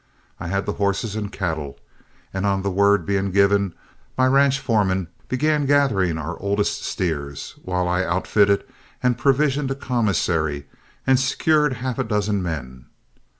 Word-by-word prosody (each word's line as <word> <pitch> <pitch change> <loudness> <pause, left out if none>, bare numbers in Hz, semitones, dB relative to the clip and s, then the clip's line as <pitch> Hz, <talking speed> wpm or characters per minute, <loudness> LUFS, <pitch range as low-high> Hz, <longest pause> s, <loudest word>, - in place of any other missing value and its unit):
I 85 - -5
had 100 +3 -1
the 105 - -2
horses 100 +2 0
and 105 -1 -4
cattle, 80 -9 -4 0.5
and 95 0 -2
on 100 -1 +1
the 100 - -1
word 100 -1 +3
being 100 +1 0
given 100 -1 +2 0.4
my 130 - +4
ranch 135 +1 +4
foreman 100 -8 0 0.2
began 150 +2 +1
gathering 110 - +2
our 80 +2 -5
oldest 100 +1 -1
steers, 70 -5 -3
while 90 -1 -1
I 90 +1 +1
outfitted 100 +3 +2 0.4
and 125 -1 +3
provisioned 140 +2 +1
a 135 - -1
commissary 85 - 0 0.4
and 130 -1 +4
secured 150 +2 +2
half 125 0 -4
a - - +2
dozen 105 -2 0
men. 65 -7 -5
100 Hz, 150 wpm, -22 LUFS, 90-125 Hz, 0.5 s, my